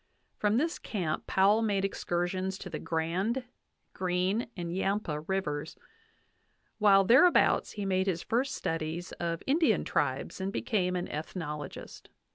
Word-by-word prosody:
From 210 Hz, +1 st, +1 dB
this 330 Hz, +6 st, 0 dB
camp 175 Hz, -8 st, -3 dB
Powell 200 Hz, +4 st, +4 dB
made 200 Hz, -3 st, +1 dB
excursions 185 Hz, 0 st, -2 dB
to 185 Hz, -, -8 dB
the 155 Hz, -, -4 dB
Grand, 180 Hz, +10 st, -1 dB, 0.5 s
Green, 185 Hz, +4 st, 0 dB
and 170 Hz, 0 st, -4 dB
Yampa 195 Hz, -5 st, -1 dB
Rivers, 155 Hz, -3 st, -3 dB, 1.0 s
while 200 Hz, -2 st, +6 dB
thereabouts 260 Hz, -, +5 dB
he 205 Hz, -1 st, -4 dB
made 190 Hz, 0 st, +1 dB
his 175 Hz, -3 st, -1 dB
first 255 Hz, +4 st, 0 dB
studies 165 Hz, +2 st, -3 dB
of 170 Hz, -1 st, -2 dB
Indian 275 Hz, -, +3 dB
tribes 135 Hz, +5 st, -1 dB
and 190 Hz, +1 st, -2 dB
became 185 Hz, -4 st, 0 dB
an 180 Hz, -, -2 dB
ethnologist. 150 Hz, -2 st, -6 dB
190 Hz, 130 wpm, -30 LUFS, 170-210 Hz, 1.0 s, while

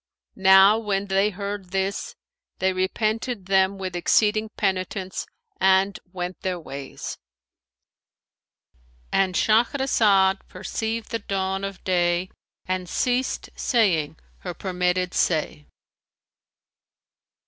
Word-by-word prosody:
Now 190 Hz, +2 st, +6 dB
when 200 Hz, -3 st, -1 dB
they 195 Hz, +1 st, +2 dB
heard 200 Hz, -1 st, -5 dB
this, 195 Hz, +1 st, -2 dB, 0.4 s
they 190 Hz, 0 st, +1 dB
repented 215 Hz, +3 st, -1 dB
them 190 Hz, 0 st, +2 dB
with 185 Hz, -2 st, -5 dB
exceeding 215 Hz, +5 st, +2 dB
penitence 190 Hz, -1 st, -2 dB, 0.3 s
and 190 Hz, +1 st, +3 dB
went 180 Hz, -1 st, -5 dB
their 185 Hz, -2 st, -2 dB
ways."—And 65 Hz, -, -8 dB
Shahrazad 215 Hz, -5 st, +3 dB
perceived 220 Hz, +4 st, -4 dB
the 230 Hz, -, -1 dB
dawn 195 Hz, -1 st, -2 dB
of 195 Hz, -2 st, -6 dB
day 175 Hz, 0 st, +1 dB, 0.3 s
and 185 Hz, -1 st, -3 dB
ceased 250 Hz, +4 st, -1 dB
saying 165 Hz, -, +1 dB, 0.2 s
her 180 Hz, -2 st, -6 dB
permitted 180 Hz, -1 st, -1 dB
say. 155 Hz, -2 st, 0 dB
190 Hz, 95 wpm, -24 LUFS, 180-205 Hz, 0.4 s, Now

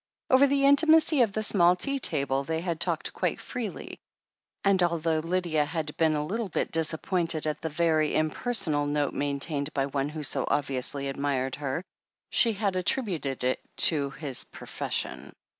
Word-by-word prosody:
Over 265 Hz, +2 st, +6 dB
the 275 Hz, 0 st, +2 dB
intimacy 310 Hz, +1 st, +5 dB
of 225 Hz, -4 st, +3 dB
the 215 Hz, +2 st, -2 dB
small 180 Hz, -4 st, +4 dB
tea 275 Hz, +9 st, 0 dB
table, 140 Hz, -, 0 dB
they 160 Hz, +2 st, -2 dB
had 170 Hz, -2 st, -3 dB
talked 170 Hz, -3 st, -1 dB
quite 180 Hz, -3 st, -1 dB
freely, 230 Hz, -6 st, -6 dB, 0.6 s
and 195 Hz, -2 st, +3 dB
although 165 Hz, -2 st, +1 dB
Lydia 165 Hz, -2 st, 0 dB
had 150 Hz, 0 st, -4 dB
been 160 Hz, -1 st, +2 dB
a 150 Hz, 0 st, -1 dB
little 220 Hz, +6 st, -3 dB
bit -, -, -2 dB
disappointed 165 Hz, 0 st, +1 dB
at 150 Hz, -1 st, -3 dB
the 160 Hz, -, -3 dB
very 155 Hz, -1 st, +1 dB
impersonal 155 Hz, -2 st, 0 dB
note 145 Hz, -1 st, 0 dB
main 145 Hz, -1 st, -2 dB
tained 145 Hz, 0 st, -2 dB
by 135 Hz, -1 st, +1 dB
one 140 Hz, 0 st, -2 dB
who 155 Hz, 0 st, -6 dB
so -, -, 0 dB
obviously 140 Hz, 0 st, -1 dB
admired 135 Hz, -1 st, -2 dB
her, 145 Hz, +3 st, -3 dB, 0.5 s
she 230 Hz, -1 st, +3 dB
had 200 Hz, -2 st, -1 dB
attributed 180 Hz, -, -2 dB
it 130 Hz, +1 st, 0 dB, 0.2 s
to 145 Hz, -4 st, +3 dB
his 135 Hz, -2 st, -5 dB
profession. -, -, -4 dB
160 Hz, 165 wpm, -27 LUFS, 145-190 Hz, 0.6 s, Over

